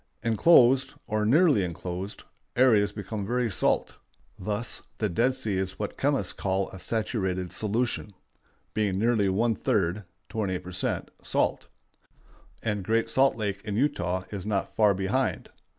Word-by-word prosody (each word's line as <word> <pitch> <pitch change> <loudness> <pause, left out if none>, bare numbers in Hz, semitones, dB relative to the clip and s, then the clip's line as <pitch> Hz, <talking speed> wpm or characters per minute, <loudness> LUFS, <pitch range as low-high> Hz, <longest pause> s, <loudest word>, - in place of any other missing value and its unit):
Inclosed, 130 +2 +5
or 105 0 0
nearly 145 - +5
inclosed, 90 +3 -5 0.3
areas 115 -5 +4
become 105 0 -5
very 120 +2 0
salt. - - 0 0.4
Thus 105 +4 -2 0.2
the 105 - 0
Dead 120 +8 +2
Sea 110 -7 -1
is 95 0 -3
what 105 - -4
chemists 135 -10 0
call 95 0 -1
a 95 - -9
saturated 95 -3 -2
solution, 110 0 -1 0.6
being 105 -3 0
nearly 110 -2 +2
one 115 +5 +2
third 95 -1 0 0.2
(28 95 -5 -2
per 90 - -8
cent.) 90 - -2
salt, - - 0 1.0
and 105 -3 -1
Great 115 +3 +1
Salt 135 +1 +4
Lake 100 -3 -3
in 105 -2 -3
Utah 95 - 0
is 100 -3 -4
not 100 -1 -2
far 105 -3 +4
behind. 100 +8 -1
105 Hz, 140 wpm, -27 LUFS, 95-115 Hz, 1.0 s, Inclosed